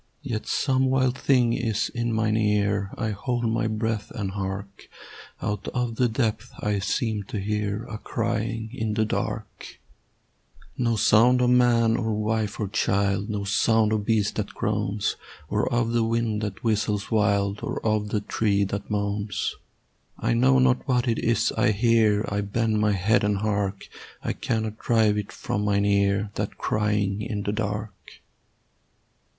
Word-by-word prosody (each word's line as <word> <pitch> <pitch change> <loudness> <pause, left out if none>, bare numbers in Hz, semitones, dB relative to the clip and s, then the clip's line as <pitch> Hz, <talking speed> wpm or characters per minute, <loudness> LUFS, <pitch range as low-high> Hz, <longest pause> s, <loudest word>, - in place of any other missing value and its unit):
Yet 120 -6 -4
some 130 -1 +1
wild 130 -1 +2
thing 125 -3 +3
is 115 -2 -1
in 120 0 -1
mine 110 -1 +1
ear; 105 -2 +1
I 110 -2 -1
hold 120 +3 -2
my 115 +1 0
breath 110 0 -2
and 100 -3 -4
hark; 100 0 -6 0.5
Out 105 0 -3
of 120 -2 -1
the 125 -1 +3
depth 110 -2 -1
I 105 -1 0
seem 105 +2 -1
to 105 - -5
hear 105 +1 -2
A 110 -3 -7
crying 115 -1 -2
in 110 -4 -2
the 110 0 +2
dark: - - -4 1.0
No 115 -2 +1
sound 115 +4 +5
of 125 0 +3
man 120 -2 +4
or 110 -2 -1
wife 110 0 -1
or 105 - -1
child, 100 0 0
No 105 -2 -2
sound 110 +2 +2
of 105 -1 0
beast 105 -1 +1
that 105 -1 -3
groans, 105 -1 -1 0.3
Or 105 +5 0
of 120 -1 +1
the 120 -1 +2
wind 115 -1 0
that 105 -3 -5
whistles 105 -2 0
wild, 100 -2 +2
Or - - -3
of 105 -1 +1
the 105 -1 -1
tree 100 -1 +1
that 100 +1 -4
moans: 100 -1 -2 0.6
I - - 0
know 130 +3 +4
not 130 -1 +2
what 125 -1 +1
it 115 - +1
is 115 0 +1
I 110 - +2
hear; 110 -1 +3
I 100 0 -1
bend 110 +2 0
my 105 -1 +3
head 100 +5 +2
and 105 -1 +1
hark: 100 -1 -2 0.4
I - - -1
cannot 110 -1 -2
drive 110 -3 +3
it 105 - -6
from 105 - -3
mine 100 -1 +2
ear, 100 0 +2
That 105 - -4
crying 105 -1 0
in 105 -2 -3
the 100 - -1
dark. 105 -1 -3
110 Hz, 165 wpm, -25 LUFS, 100-115 Hz, 1.0 s, sound